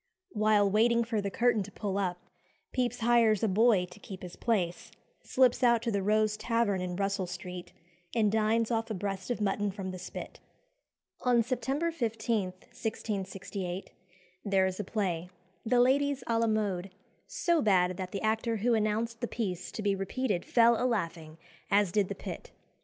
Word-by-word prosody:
While 210 -1 +3
waiting 230 +4 +3
for 225 -2 -1
the 200 - -2
curtain 230 +2 +2
to 200 +1 -7
pull 200 -1 -3
up, 180 -3 -1 0.6
Pepys 250 -2 -1
hires 230 -3 +4
a - - +4
boy 210 -1 +4
to 195 - -13
keep 190 -2 -9
his 180 -1 -8
place, 220 0 -1 0.3
slips 255 -1 +3
out 235 -2 +4
to 235 - 0
the 200 -2 0
Rose 215 +1 +2
Tavern 230 -4 0
in 180 -1 -3
Russell 195 -1 -1
Street, 180 0 -7 0.4
and 215 -3 +3
dines 220 +1 +2
off 225 0 0
a 220 - -2
breast 195 +1 -4
of 245 - -1
mutton 205 0 0
from 190 -1 -5
the 185 - -7
spit. 185 - -8 0.8
On 245 -2 +3
September 270 +7 -1
15, 225 - -1
1668, 195 -1 -5 0.5
there 195 -2 +2
is 185 +1 -2
a - - -1
play 180 -4 -2 0.3
"The 245 +2 +2
Ladies 275 +1 +3
à 230 -1 +2
la 230 - +2
Mode" 200 -4 -1 0.4
so 340 -2 +1
bad 185 -3 +3
that 185 -1 -5
the 200 - -4
actor 225 +1 +1
who 235 +3 +2
announced 225 +2 0
the 240 - -1
piece 190 -8 -3
to 215 - -5
be 200 -1 +2
repeated 195 0 -1
fell 235 0 +4
a - - +2
laughing, 165 -8 -3 0.3
as 200 -2 +3
did 205 0 +2
the - - -3
pit. - - -7
215 Hz, 175 wpm, -30 LUFS, 190-230 Hz, 0.8 s, hires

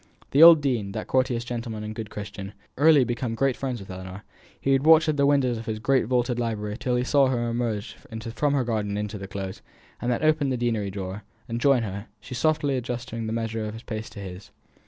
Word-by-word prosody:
The 140 - +4
old 165 -2 +10
dean, 115 -8 -1
that 110 - -4
courteous 125 -2 +1
gentleman 115 -3 -4
and 105 0 -5
good 110 -1 -6
Christian, 100 -1 -7 0.3
had 145 - 0
early 155 -4 +7
become 120 -1 -2
great 135 +1 +1
friends 130 -3 -3
with 95 -1 -9
Ellinor. 95 +2 -8 0.4
He 135 - 0
would 135 0 +3
watch 160 +1 +6
at 155 - +2
the 140 -1 +3
windows 130 -5 +2
of 115 - -9
his 110 -1 -2
great 130 +4 +2
vaulted 125 0 +1
library 105 -3 -2
till 125 -1 0
he 125 - +1
saw 140 +1 +4
her 120 -2 0
emerge 115 -2 -2
from 110 - -11 0.4
the 135 -2 +2
garden 105 -4 -1
into 105 0 -4
the 95 - -7
Close, 95 -1 -6 0.4
and 120 - 0
then 120 - -1
open 155 -2 +3
the 130 - 0
deanery 115 -4 -1
door, 95 +1 -5 0.3
and 115 +1 -3
join 135 -4 +4
her, 100 0 -5
she 105 - -10
softly 145 +1 +1
adjusting 120 -2 -4
the - - -3
measure 115 -1 -2
of 105 +1 -5
her - - -7
pace 110 -1 -5
to - - -10
his. 95 +1 -8
115 Hz, 230 wpm, -25 LUFS, 105-130 Hz, 0.4 s, old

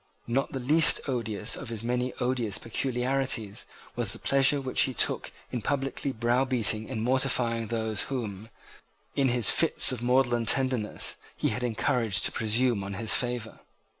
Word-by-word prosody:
Not 130 +4 -2
the 135 - -4
least 155 +6 +6
odious 115 -4 -1
of 135 - -8
his 115 -1 -3
many 125 +1 -2
odious 125 -5 -2
peculiarities 125 -3 -2 0.3
was - - +2
the - - -3
pleasure 135 +1 +2
which 130 -2 0
he 130 -3 +1
took - - 0 0.2
in 120 - -4
publicly 135 +3 -3
browbeating 120 -2 0
and 110 - -4
mortifying 125 -3 0
those 110 -2 -2
whom, 110 -5 -5 0.7
in 135 -2 +1
his 120 -4 +4
fits 165 - +5
of 125 -3 -4
maudlin 120 -2 +1
tenderness, 130 -5 0 0.2
he - - 0
had 125 - -4
encouraged 115 -2 +1
to - - +2
presume 115 -1 0
on 100 0 -6
his 110 +2 +1
favour. 120 -3 -1
120 Hz, 155 wpm, -27 LUFS, 110-130 Hz, 0.7 s, least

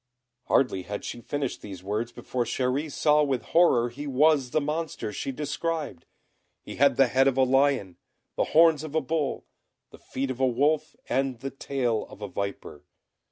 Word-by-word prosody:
Hardly 125 -8 +2
had 105 +3 -6
she 120 - -6
finished 140 +1 -3
these 95 -3 -9
words 105 +4 -2
before 125 +1 -3
Chéri 130 +5 -1
saw 150 +1 +3
with 135 -4 0
horror 125 -9 +4
he 145 +5 -7
was 140 -1 +3
the 155 - +1
monster 150 -7 -3
she 135 - -3
described. 150 - -4 0.6
He - - -9
had 140 -1 +4
the 135 - +6
head 130 +2 +3
of 135 -1 +1
a 135 - +5
lion, 130 -7 +2 0.4
the - - +1
horns 160 -2 +4
of 155 -1 -7
a 160 - +3
bull, 155 -4 -2 0.5
the - - -14
feet 135 0 -4
of 130 - -7
a 130 - +3
wolf, 145 +5 +1
and 130 -1 -1
the 135 +1 -4
tail 125 -5 -2
of - - -13
a - - -3
viper. 100 -6 -5
135 Hz, 180 wpm, -26 LUFS, 120-150 Hz, 0.6 s, the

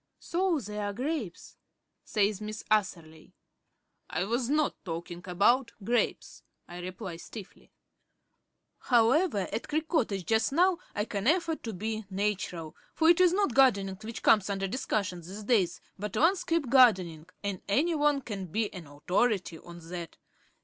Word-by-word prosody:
"So 350 -2 0
there 210 -2 -5
are 205 - -3
grapes," 255 - -4 0.5
says 205 -1 0
Miss 215 0 -6
Atherley. 170 -7 -1 0.7
"I 170 - -1
was 235 +4 -1
not 300 +1 +1
talking 170 0 -6
about 230 +8 +2
grapes," 240 +3 -1 0.3
I 175 0 -9
reply 180 0 -6
stiffly. 200 +3 -11 1.1
However 240 - +3
at 225 - -3
Creek 310 +1 -1
Cottage 215 - 0
just 220 +2 +1
now 355 +2 +3 0.2
I 205 - 0
can 200 -1 -3
afford 330 0 +1
to 225 - -4
be 215 +3 -4
natural; 190 -5 -3 0.2
for 320 0 +4
it 345 +1 +6
is 360 -2 +6
not 390 - +1
gardening 200 -8 +3
which 225 +1 -7
comes 210 -2 +4
under 195 -1 -1
discussion 195 -5 -2
these 190 +6 -9
days, 205 -6 +2 0.2
but 210 -1 -4
landscape 335 -3 +2
gardening, 185 - +4 0.2
and 200 -2 -3
any 300 +12 +2
one 295 -2 +2
can 200 -6 -6
be 210 +5 -2
an 175 -5 -9
authority 180 +4 0
on 170 -1 -12
that. 170 -2 -7
210 Hz, 150 wpm, -29 LUFS, 185-265 Hz, 1.1 s, it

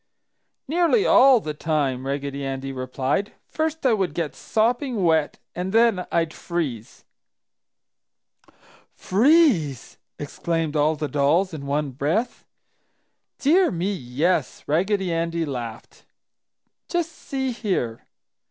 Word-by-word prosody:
"Nearly 345 - +2
all 265 -1 +6
the 155 -7 -5
time!" 145 -4 -1
Raggedy 140 0 -3
Andy 135 0 -4
replied. 130 +8 -2
"First 315 -1 -3
I 250 - +5
would 195 -4 -1
get 165 -4 -2
sopping 240 0 0
wet 160 -3 +2 0.2
and 180 +2 -3
then 225 -5 +3
I'd 165 -1 0
freeze!" 145 - -5 1.9
"Freeze!" 215 - +2 0.2
exclaimed 160 +1 -3
all 150 +1 +2
the 150 0 -3
dolls 150 +7 +1
in 140 -3 -6
one 145 0 -1
breath. 160 - -2 0.9
"Dear 345 +6 +4
me, 185 +4 -2
yes!" 145 +1 -1
Raggedy 185 +3 0
Andy 165 0 -1
laughed. 120 -6 -7 0.8
"Just 345 -2 -1
see 265 -4 -4
here!" 185 - -3
165 Hz, 110 wpm, -23 LUFS, 140-225 Hz, 1.9 s, all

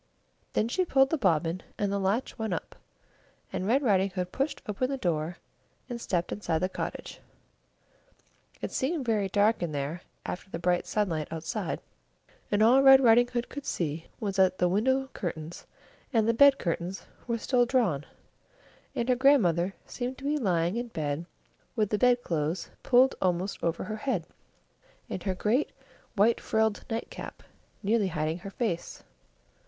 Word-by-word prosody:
Then 215 - +2
she 370 +10 +1
pulled 270 -5 +3
the 320 - +2
bobbin, 170 - +1 0.2
and 205 -1 0
the 200 - 0
latch 200 +6 0
went 220 -6 -2
up, - - -7 0.8
and 185 - -2
Red 265 +6 +3
Riding 195 -5 +3
Hood 180 -1 -4
pushed 275 +3 -1
open 215 +5 -1
the 275 - -2
door, 170 -5 -1 0.5
and 240 -2 -5
stepped 175 -5 -1
inside 175 -6 -1
the 185 +3 0
cottage. - - -5 1.4
It - - -2
seemed 280 +1 -1
very 210 -4 +1
dark 210 +3 +3
in 170 -3 -2
there 145 +5 -3 0.2
after 185 - -5
the 165 - -4
bright 175 +1 0
sunlight 170 -8 -1
outside, 165 0 -3 0.7
and 205 +1 +3
all 250 +4 +6
Red 270 -1 +9
Riding 245 -1 +6
Hood 245 -1 -2
could 285 - -7
see 160 -1 -2
was 200 -3 -3
that 185 -1 +4
the 180 - +3
window 260 +8 +2
curtains 165 -3 -5 0.4
and 225 -4 +2
the 230 - +4
bed 280 +3 +7
curtains 175 +2 -3 0.2
were 235 -1 0
still 245 +1 +2
drawn, 220 - +1 0.9
and 235 - -1
her 255 - +4
grandmother 195 - +3
seemed 250 +1 -4
to - - -12
be 290 +2 +1
lying 180 -3 +1
in 240 +1 -2
bed 155 -4 -3 0.5
with 215 -4 +1
the 210 - +1
bed 245 -1 +4
clothes 160 +1 -2
pulled 260 +1 +5
almost 185 +1 -1
over 170 0 0
her 215 0 -4
head, 260 +5 -1 0.9
and 185 - -3
her 190 -1 -2
great 225 +10 +1 0.5
white 220 +3 +3
frilled 220 -1 +1
nightcap 225 +1 -6 0.4
nearly 210 0 +2
hiding 155 0 -2
her 195 - -7
face. 195 -5 -3
205 Hz, 165 wpm, -28 LUFS, 175-245 Hz, 1.4 s, Red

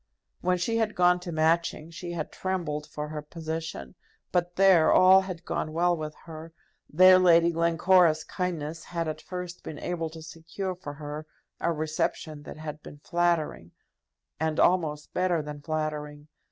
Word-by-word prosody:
When 180 0 +1
she 225 +6 -1
had 220 -1 0
gone 180 0 +4
to 180 -1 -7
Matching, 160 0 +1
she 175 +1 -6
had 160 -3 -4
trembled 165 -6 -3
for 150 0 -6
her 150 -1 -5
position; 160 +2 -6 0.4
but 175 -1 0
there 190 -4 +5
all 185 +1 +7
had 185 -3 -7
gone 155 - -3
well 175 +2 +2
with 155 -2 -6
her; 160 0 -9 0.4
there 185 +3 +7
Lady 170 -2 +5
Glencora's 170 0 +3
kindness 165 -4 -4
had 170 -2 -3
at 155 - -4
first 180 -1 -7
been 155 - -7
able 170 -2 -3
to 160 0 -11
secure 165 +4 -5
for 175 -5 -8
her 150 +1 -7 0.3
a 170 - 0
reception 155 -1 -2
that 150 - -10
had 155 -1 -7
been 145 - -11
flattering, 170 - 0 0.7
and 160 0 -1
almost 155 -5 +1
better 180 -2 +1
than 150 -1 -8
flattering. 150 -1 -4
165 Hz, 160 wpm, -27 LUFS, 155-180 Hz, 0.7 s, all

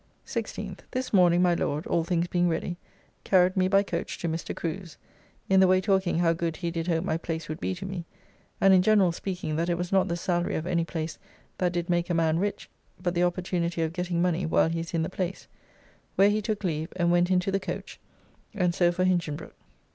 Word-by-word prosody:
16th. - - -5
This 255 -2 -4
morning 180 -2 +5
my 175 -1 +4
Lord 150 -2 -1
(all 170 - +1
things 170 0 0
being 175 0 +1
ready) 170 +1 -2 0.5
carried 185 -1 +4
me 185 -1 +3
by 195 +1 +4
coach - - -4
to 170 - -3
Mr. 165 0 -3
Crew's, 170 0 -5 0.5
(in 190 0 +4
the 190 - +6
way 185 0 +4
talking 190 -3 +1
how 170 -1 +3
good 165 -1 -2
he 170 -2 -3
did 165 0 -3
hope 165 -1 +1
my 165 -4 0
place 165 -1 -4
would 155 +2 -5
be 190 - -2
to 185 +2 -7
me, 190 -3 -5 0.5
and 195 0 +6
in 185 - +6
general 195 -2 +4
speaking 175 -3 -4
that 170 +2 0
it 170 - +1
was 175 +1 -3
not 190 -1 +3
the 170 -1 -2
salary 175 0 -1
of 160 - -2
any 175 -2 +1
place 160 -1 -4 0.4
that 180 -1 +2
did 175 -1 -2
make 175 -1 0
a 175 - +1
man 165 0 +2
rich, 205 +2 -2 0.3
but 180 -1 -1
the 175 - +1
opportunity 175 -1 -1
of 160 0 -2
getting 175 -1 -1
money 180 0 +1
while 160 0 +3
he 165 0 -2
is 165 +1 -5
in 165 - +1
the - - -1
place) 185 0 -4 0.7
where 200 +1 +5
he 215 +1 0
took 210 -1 -3
leave, 160 -2 -2
and 175 -2 +2
went 175 0 +3
into 185 +1 +2
the 195 - +1
coach, - - -6 0.6
and 180 -4 +1
so 175 0 +3
for 185 +1 -1
Hinchinbroke. 170 -4 -1
175 Hz, 225 wpm, -27 LUFS, 170-185 Hz, 0.7 s, the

